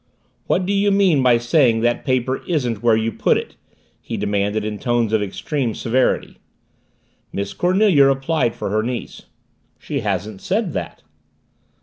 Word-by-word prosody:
"What 185 - +1
do 200 - -1
you 200 +1 +2
mean 195 -7 +3
by 125 -2 +4
saying 120 -1 +2
that 120 +1 0
paper 130 -1 0
isn't 125 - -1
where 120 -2 +4
you 110 +1 0
put - - +1
it?" - - -6 0.5
he - - -5
demanded 105 +1 -1
in 105 -1 -4
tones 120 -3 0
of 110 - +3
extreme 115 +4 -3
severity. 125 +2 0 0.9
Miss 100 0 -4
Cornelia 180 -5 +4
replied 135 -2 +1
for - - -4
her 110 +1 +1
niece. 120 +2 -6 0.5
"She 140 - -4
hasn't 100 -2 -3
said 195 -3 -1
that." 85 -4 -6
120 Hz, 150 wpm, -20 LUFS, 110-150 Hz, 0.9 s, by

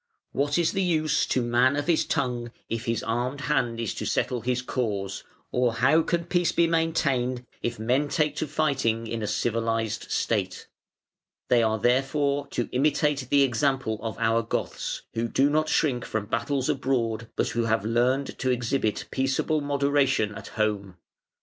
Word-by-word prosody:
What 145 +2 0
is 170 -2 +2
the 195 - -1
use 155 -5 +1
to 130 - +1
man 120 +3 +3
of 145 0 -1
his 170 -2 +2
tongue, 120 -3 -1 0.2
if 115 +1 -3
his 115 0 -1
armed 125 +5 -2
hand 125 -6 0
is 115 -3 -2
to - - -5
settle 125 -2 0
his 125 +1 -1
cause, 100 -7 -2 0.3
or 125 -2 +1
how 135 +7 +4
can 170 +1 -1
peace 175 0 +1
be 170 - +3
maintained 140 -7 0 0.2
if 120 0 -2
men 125 +7 +1
take 150 0 +1
to 155 - -1
fighting 135 -7 0
in 115 0 -4
a 105 - -2
civilised 115 -1 -1
State? 95 -5 -1 0.8
They 120 -1 +5
are 110 -1 +2
therefore 140 +4 +1
to 120 -3 -2
imitate 145 0 +1
the 140 -1 +5
example 130 -3 0
of 110 -1 -4
"our 115 0 +2
Goths", 115 - -3
who 115 +1 -1
do 135 +5 +2
not 155 +1 +1
shrink 125 -6 +1
from 110 -2 -3
battles 120 +5 -1
abroad, 115 -4 -1
but - - 0
who 115 0 -1
have 110 -2 +1
learned 125 +4 +1
to 130 - 0
exhibit 120 -2 0
peaceable 135 +4 0
moderation 140 -5 +1
at - - -9
home. 105 -4 -2
125 Hz, 170 wpm, -26 LUFS, 115-145 Hz, 0.8 s, They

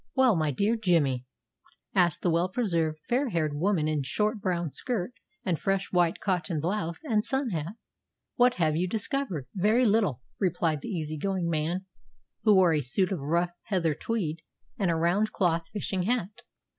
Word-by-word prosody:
"Well, 260 -5 +5
my 155 -2 +1
dear 200 - +1
Jimmy," 160 - +1 0.7
asked 175 -4 +2
the 175 - +3
well 170 +3 +2
preserved, 170 -8 0
fair 255 +2 +1
haired 155 -6 0
woman 165 0 +1
in 155 -2 0
short 210 - -1
brown 175 -5 -1
skirt 240 - -3 0.3
and 175 -4 0
fresh 195 0 -1
white 175 -2 +2
cotton 180 -4 -1
blouse 170 - -2
and 220 -8 +1
sun 265 +1 -1
hat, 165 +2 -3 0.6
"what 245 0 +4
have 155 -3 +1
you 175 +3 +1
discovered?" 220 - -2
"Very 215 +6 +3
little," 200 - +2 0.2
replied 165 -5 0
the - - -6
easy 155 -6 -3
going 185 -1 -1
man, 165 +4 -1 0.6
who 215 -2 +5
wore 180 -3 +5
a 150 - +2
suit 180 +10 0
of 185 - -1
rough 170 +5 0
heather 175 -6 +1
tweed 170 -3 -2 0.4
and 195 -4 0
a 165 - +2
round 180 +7 +1
cloth 170 -3 +1
fishing 195 -2 -2
hat. 210 0 -1
180 Hz, 170 wpm, -28 LUFS, 160-210 Hz, 0.7 s, Well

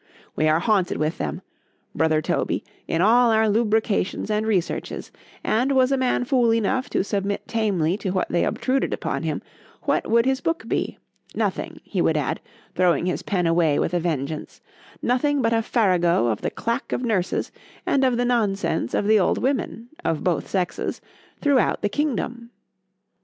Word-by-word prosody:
_——We 155 0 +3
are 155 - +4
haunted 195 -2 +1
with 155 +1 -1
them, 75 -2 -3 0.5
brother 155 -1 +2
Toby, - - -1 0.2
in 165 - 0
all 235 +3 +5
our 220 0 +3
lucubrations 215 -2 +1
and 215 +1 0
researches; 190 -6 -2 0.3
and 250 +5 +1
was 260 0 +3
a - - +4
man 255 -1 +1
fool 245 -3 +3
enough 230 +4 0
to - - +1
submit 200 0 -2
tamely 195 -6 0
to 205 - -3
what 185 0 0
they 170 - +1
obtruded 265 +1 0
upon - - -3
him,—what - - -4
would 230 +1 +4
his 265 0 +1
book 330 +1 -2
be? - - -2 0.4
Nothing,—he - - -2
would - - +2
add, - - -1 0.3
throwing 180 -1 +2
his 180 - -1
pen 180 -4 -1
away 165 -3 +3
with 175 - 0
a 175 - +2
vengeance,—nothing 175 - -2
but 230 -3 +2
a 225 - +3
farrago 180 - +2
of 110 - -2
the - - -1
clack 230 0 -3
of 250 - -1
nurses, 200 -7 0 0.3
and 270 - +2
of 255 -2 +2
the 245 - +1
nonsense 200 - 0
of - - 0
the 215 0 +5
old 185 - +2
women 255 -3 -2 0.2
(of 160 - -1
both 175 -5 0
sexes) 180 -3 -2 0.4
throughout 275 -7 +2
the 205 - +2
kingdom. 245 -2 -2
215 Hz, 165 wpm, -23 LUFS, 175-245 Hz, 0.5 s, all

